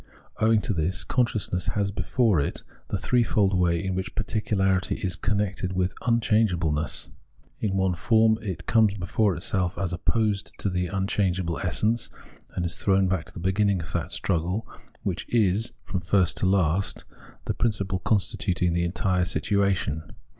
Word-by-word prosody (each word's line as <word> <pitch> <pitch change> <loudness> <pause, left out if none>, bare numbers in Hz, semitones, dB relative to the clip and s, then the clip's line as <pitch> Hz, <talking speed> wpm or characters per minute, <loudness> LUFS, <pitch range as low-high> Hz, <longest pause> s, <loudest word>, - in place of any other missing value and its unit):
Owing 110 0 +4
to 110 - -1
this, 85 +2 0
consciousness 110 -7 0
has 100 -1 +1
before 110 - +1
it 70 - -2 0.2
the - - -1
threefold 110 -5 +2
way 85 -2 +2
in 95 - -1
which 95 +1 -4
particularity 100 -4 0
is 90 -3 -2
connected 95 -1 -1
with 90 0 0
unchangeable 105 -8 +2
ness. 75 +1 -2 0.5
In 95 -3 -1
one 95 -1 +2
form 110 +5 +3
it 95 -5 -5
comes 110 -3 +3
before 100 +1 +1
itself 90 +2 -1
as 95 -3 -2
opposed 105 +3 0
to 100 - -1
the 90 0 -1
imchangeable 95 -2 -1
essence, 110 +6 0 0.5
and 90 - -1
is 85 - +1
thrown 95 -1 +2
back 90 -3 -1
to - - -14
the - - -8
beginning 95 +2 +1
of 80 0 -7
that 85 - -2
struggle, 90 +4 -1 0.4
which - - -3
is, 110 0 +2
from 95 -2 -3
first 90 +1 +2
to - - +1
last, 95 -1 +1 0.4
the - - -1
principle 100 -4 -1
constituting 95 -2 0
the 85 0 +1
entire 90 +1 0
situation. 95 -5 0
95 Hz, 155 wpm, -26 LUFS, 90-105 Hz, 0.5 s, Owing